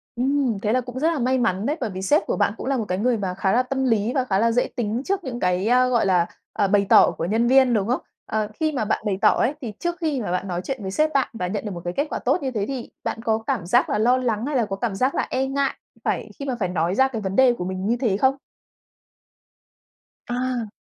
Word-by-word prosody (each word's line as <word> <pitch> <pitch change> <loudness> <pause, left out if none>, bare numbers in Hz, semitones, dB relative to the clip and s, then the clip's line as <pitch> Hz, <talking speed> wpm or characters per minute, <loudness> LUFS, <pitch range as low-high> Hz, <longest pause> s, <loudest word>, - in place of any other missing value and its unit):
Ừm, 255 -3 0
thế 215 -1 0
là 255 - +2
cũng 250 +1 -7
rất 320 +3 +2
là 310 - -2
may 260 +1 +1
mắn 210 -4 0
đấy. 295 +5 0
Bởi - - -1
vì 185 -1 -6
sếp 290 +11 +2
của - - -1
bạn 205 -1 +2
cũng - - -6
là 275 -1 +1
một 225 - -2
cái 180 - -1
người 235 +3 +1
mà 190 -3 -2
khá 190 +1 0
là 250 +2 +3
tâm 265 +1 -2
lý 225 -1 +1
và 265 - +1
khá 195 -5 +1
là 230 +2 +3
dễ 245 +2 +1
tính 230 0 -1
trước 395 -1 -1
những 245 -4 -5
cái, 180 +1 +1
a, 250 +1 +4
gọi 240 -4 +2
là, 180 -3 +3 0.3
ờ, 205 -2 +1
bày 200 0 +3
tỏ - - +7
của 165 - -2
nhân 225 +6 +1
viên, 260 -1 +5
đúng 210 -2 +1
không? 250 - 0 0.2
Ờ, 215 -1 -1
khi 310 +7 -1
mà 255 -7 -1
bạn 215 - 0
bày 195 -2 0
tỏ - - +7
ấy, 260 - +1
thì 230 -5 -5
trước 345 0 -2
khi 300 -6 0
mà 200 - -3
bạn 180 +2 -2
nói 175 -1 -2
chuyện 265 -1 -4
với 190 - -4
sếp 310 +9 +2
bạn 275 -2 +2
và 180 -5 -3
nhận 205 +4 -4
được 210 - -3
một 175 -2 -6
cái 175 - -2
kết 285 +2 +1
quả - - -3
tốt - - +1
như 265 - -1
thế 210 -4 -1
thì 260 -3 -5
bạn 225 - -3
có 220 -2 +2
cảm 175 - -1
giác 240 +9 +3
là - - +1
lo 240 +4 +3
lắng 235 -3 -1
hay 290 0 -2
là 235 - +2
có 195 - -4
cảm 200 0 -2
giác 255 +6 +1
là - - 0
e 260 +1 0
ngại 275 0 0 0.3
phải - - -2
khi 280 - -4
mà 260 -3 -2
phải 185 -4 0
nói 175 +1 0
ra 265 +3 +4
cái 235 -5 -5
vấn 190 -1 -3
đề 260 -2 +5
của 180 -7 -5
mình 185 +1 -4
như 235 - +1
thế 220 -7 +1
không? 265 +5 +3 1.9
À. 245 -2 -2
235 Hz, 290 wpm, -23 LUFS, 200-260 Hz, 1.9 s, tỏ